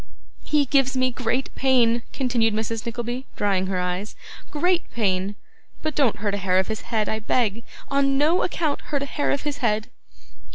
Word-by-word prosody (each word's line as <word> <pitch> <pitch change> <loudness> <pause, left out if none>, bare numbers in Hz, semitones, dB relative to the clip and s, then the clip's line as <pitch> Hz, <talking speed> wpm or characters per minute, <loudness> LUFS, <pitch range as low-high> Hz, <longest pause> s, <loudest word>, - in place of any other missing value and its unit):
'He 300 -2 +2
gives 270 -1 +2
me 255 0 +2
great 250 +2 -1
pain,' 240 -3 +3
continued 235 -5 +1
Mrs. 220 +1 -2
Nickleby, 240 +2 -4
drying 195 -2 +1
her 185 -1 -1
eyes, 180 +3 -3 0.3
'great 355 +3 +1
pain; 195 -2 0 0.5
but 310 - -1
don't 270 -7 +3
hurt 205 -1 -2
a - - 0
hair 185 0 +2
of 190 +2 +1
his 220 0 -3
head, 220 -3 -1
I 220 - -1
beg. 225 0 0 0.3
On 275 -1 +3
no 315 +6 +3
account 315 -5 -1
hurt 285 -2 -1
a - - -2
hair 290 +1 -1
of 280 - 0
his 290 -1 -3
head. 215 -4 0
235 Hz, 180 wpm, -24 LUFS, 210-275 Hz, 0.5 s, pain